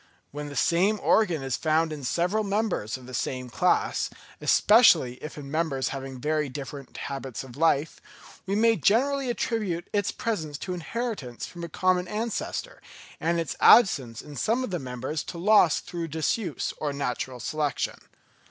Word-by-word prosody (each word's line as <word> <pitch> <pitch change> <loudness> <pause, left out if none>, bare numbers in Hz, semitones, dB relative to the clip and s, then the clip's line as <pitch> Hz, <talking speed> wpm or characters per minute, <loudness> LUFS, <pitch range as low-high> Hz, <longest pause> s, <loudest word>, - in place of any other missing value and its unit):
When 145 +1 -6
the 145 - -9
same 185 +10 +2
organ 175 -10 +2
is 135 -2 -1
found 160 0 +1
in 145 -2 -7
several 180 - 0
members 200 - -1
of 130 - -14
the 130 - -10
same 125 0 -3
class, 180 +8 +1 0.3
especially 170 - +5
if 155 - -7
in 140 -2 -8
members 155 -4 0
having 135 -1 -6
very 150 +1 0
different 140 0 -8
habits 135 -4 -5
of 125 -3 -12
life, 160 -1 +1 0.5
we 195 - 0
may 225 +1 +4
generally 270 +5 +2
attribute 210 -7 -2
its 205 -1 +1
presence 160 -10 -3
to 180 - -4
inheritance 180 - -4
from 175 -1 -9
a 170 - -5
common 185 +2 +1
ancestor; 225 - -4 0.4
and 170 +1 +1
its 165 - -3
absence 140 - +5
in 150 -1 -11
some 235 - +1
of 255 - -4
the 175 - -1
members 130 +4 -4
to 175 - -7
loss 185 -3 +5
through 170 -1 -5
disuse 160 +7 -2
or 150 -2 -2
natural 130 -2 -3
selection. 150 +4 -2
160 Hz, 160 wpm, -26 LUFS, 135-200 Hz, 0.5 s, especially